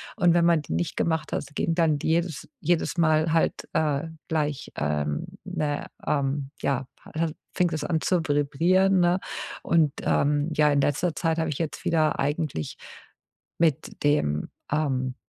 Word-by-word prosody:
Und 175 -2 +4
wenn 170 -1 +4
man 170 -3 +4
die - - -5
nicht 170 -3 -1
gemacht 160 -1 0
hat, - - -1
ging 165 - 0
dann 160 -4 +3
jedes 165 -2 0
jedes 170 +2 +1
Mal 155 0 +3
halt, 165 - +1
äh, 155 +1 0 0.2
gleich, 150 -3 -1
ähm, 75 0 -1 0.2
'ne, 145 -1 -2 0.2
ähm 140 -1 0
ja, 135 -1 0 0.3
ha 165 0 +1 0.3
fing 180 -1 +3
das 155 -1 -2
an 160 -2 0
zu 180 -3 +2
vibrieren, 165 +6 +3
ne? 175 +2 +3 0.4
Und 160 -4 +3
ähm, 145 +2 +2
ja, 150 -1 +4
in 140 -1 +3
letzter 150 +3 0
Zeit 165 -1 0
habe 160 -1 0
ich 145 - -3
jetzt 160 -2 -3
wieder 155 -2 +2
eigentlich 145 - -2 0.8
mit 160 -4 0
dem, 75 - +1 0.2
ähm, 130 -4 0
155 Hz, 155 wpm, -26 LUFS, 145-165 Hz, 0.8 s, Und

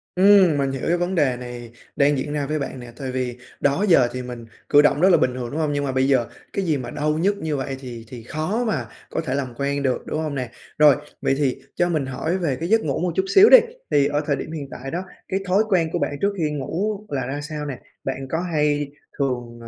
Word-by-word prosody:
Ừm, 190 -5 +6
mình 135 -1 0
hiểu 135 - -5
cái 175 +1 +2
vấn 175 +2 -1
đề 130 -6 +2
này 120 -1 -8 0.2
đang 145 0 +3
diễn 145 +3 -3
ra 145 -2 -1
với 155 0 -1
bạn 135 -2 -5
nè. 120 -1 -9
Tại 130 -2 -4
vì 125 -1 -3 0.2
đó 145 +9 +2
giờ 145 -9 +6
thì 125 - -3
mình 120 -2 -7 0.2
cử 145 0 +7
động 150 +1 +3
rất 190 - +6
là 175 - +6
bình 125 - +1
thường, 120 -2 -5
đúng 155 - -3
hông? 150 -2 0
Nhưng 145 0 -1
mà 135 - -1
bây 130 +1 +2
giờ 130 -4 +3 0.3
cái 195 - -1
gì 155 -4 +1
mà 125 - -6
đau 150 +1 0
nhức 200 +4 +1
như 155 -5 -2
vậy 135 0 -3
thì 120 -3 -8
thì 120 -2 -9
khó 160 - -2
mà 215 - -1 0.2
có - - -2
thể 135 -5 -3
làm 130 -4 -3
quen 140 0 -1
được, 130 -2 0
đúng 155 - -3
hông 150 -2 -3
nè? 125 -3 -3 0.3
Rồi, 150 -2 +7 0.3
vậy - - +2
thì 140 -4 0
cho 175 0 +2
mình 155 -5 0
hỏi 160 +7 -2
về 155 -8 0
cái 165 +7 -4
giấc 225 0 +4
ngủ 140 -3 -1
một 175 0 0
chút 190 - +1
xíu 400 +3 +9
đi, - - +11 0.3
thì 140 -1 +4
ở 145 +1 0
thời 145 - +1
điểm 155 - -6
hiện 145 -4 -5
tại 135 +2 -7
đó, 175 +2 -2 0.3
cái 190 - -1
thói 195 +4 +4
quen 170 -4 +2
của 175 - 0
bạn - - 0
trước 200 0 +2
khi 155 -3 0
ngủ 190 +9 -2
là 130 -3 -2
ra 145 +3 -4
sao 150 0 -5
nè? 140 -3 -5 0.2
Bạn 135 0 -4
có 165 +1 -1
hay 150 -4 0 0.3
thường, 120 -4 -2
à, 115 - -9
145 Hz, 270 wpm, -22 LUFS, 130-165 Hz, 0.3 s, đi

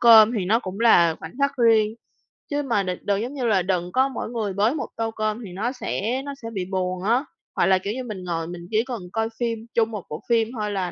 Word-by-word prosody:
cơm 225 -1 +8
thì 185 - -1
nó 215 +5 +3
cũng 190 0 -6
là 170 -8 +6
khoảnh 160 - -8
khắc 280 0 +2
riêng. 225 -3 +4 0.6
Chứ 290 0 -1
mà 230 -7 +1
đ 185 - -3
đừng 200 0 0
giống 245 +4 -4
như 265 -4 -2
là 205 -5 +3
đừng 180 -1 -1
có 260 +5 +3
mỗi 260 - -4
người 220 -5 -2
bới 215 +8 +2
một - - -3
tô 225 0 -1
cơm 215 +1 -2
thì 190 - -9
nó 225 +6 -1
sẽ 250 0 -2
nó 280 - -4
sẽ 230 - -5
bị 190 -2 -2
buồn 185 -1 -1
á. 240 +7 +2 0.3
Hoặc - - +3
là, 190 -1 +5
kiểu 200 +3 -3
như, 255 +2 -4
mình 210 -6 -6
ngồi 165 -2 -2
mình 175 0 -8
chỉ 220 +1 +3
cần 245 -5 -5
coi 225 0 0
phim 230 -2 -1
chung 230 -1 +2
một 210 -4 -5
bộ 150 - -6
phim 230 -2 +3
thôi 210 -1 -1
là 185 -3 -2
215 Hz, 265 wpm, -24 LUFS, 190-235 Hz, 0.6 s, cơm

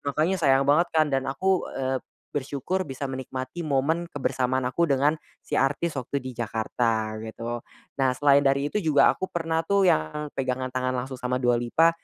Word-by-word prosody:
makanya 155 +6 0
sayang 135 -3 +4
banget 155 +5 +4
kan 155 -1 +4
dan 135 0 0
aku, 190 +7 +1
eee, 130 0 0 0.3
bersyukur 145 +7 -2
bisa 135 0 -5
menikmati 130 +4 -5
momen 155 +5 +1
kebersamaan 130 -4 -1
aku 130 +7 +1
dengan 145 +2 +2 0.2
si - - -1
artis 145 +3 0
waktu 135 +2 -3
di 130 - -5
Jakarta 110 -1 -1
gitu. 115 +2 -5 0.4
Nah 130 -2 +2
selain 140 +1 +5
dari 140 +1 +2
itu 210 - 0
juga 150 -7 +4
aku 190 - -3
pernah 165 -2 -2
tuh 200 +1 +3
yang 150 - -1
pegangan 130 -1 -2
tangan 130 0 -1
langsung 130 +1 -4
sama 125 +1 -2
Dua 120 -1 +3
Lipa, 140 +8 +3
135 Hz, 175 wpm, -26 LUFS, 130-155 Hz, 0.4 s, selain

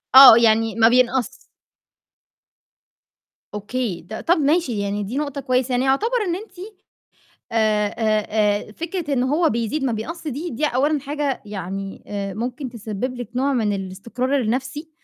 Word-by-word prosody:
آه، 260 -4 +12
يعني 225 -1 +3
ما 225 0 +5
بينقص. 250 -1 +2 2.2
أوكي، 210 -2 -3
ط - - -7
طَب 335 +10 +1
ماشي 295 -6 +1
يعني 200 +1 -2
دي 235 +8 -5
نقطة 285 -2 -3
كويسة. 255 -1 0
يعني 250 +1 +1
يعتبر 440 - +1
إن 340 - 0
أنتِ 425 +5 -9 1.0
آآ 215 -2 +2 0.4
آآ 210 -1 +1
آآ - - -13
فكرة 335 - -4
إن 250 -2 +1
هو 305 +5 +2
بيزيد 235 +5 -2
ما 260 - +1
بيقص 320 +11 -5
دي، 300 +6 -4
دي 280 +6 -1
أولًا 290 +3 +1
حاجة 285 0 -3
يعني 195 -1 -6
آآ 200 -2 -4
ممكن 245 +5 -4
تسبِّب 235 +2 -5
لِك 245 -3 -7
نوع 275 +2 +1
من 220 -5 +1
الاستقرار 230 +8 -2
النَفْسي 265 +7 -3
250 Hz, 150 wpm, -22 LUFS, 215-285 Hz, 2.2 s, آه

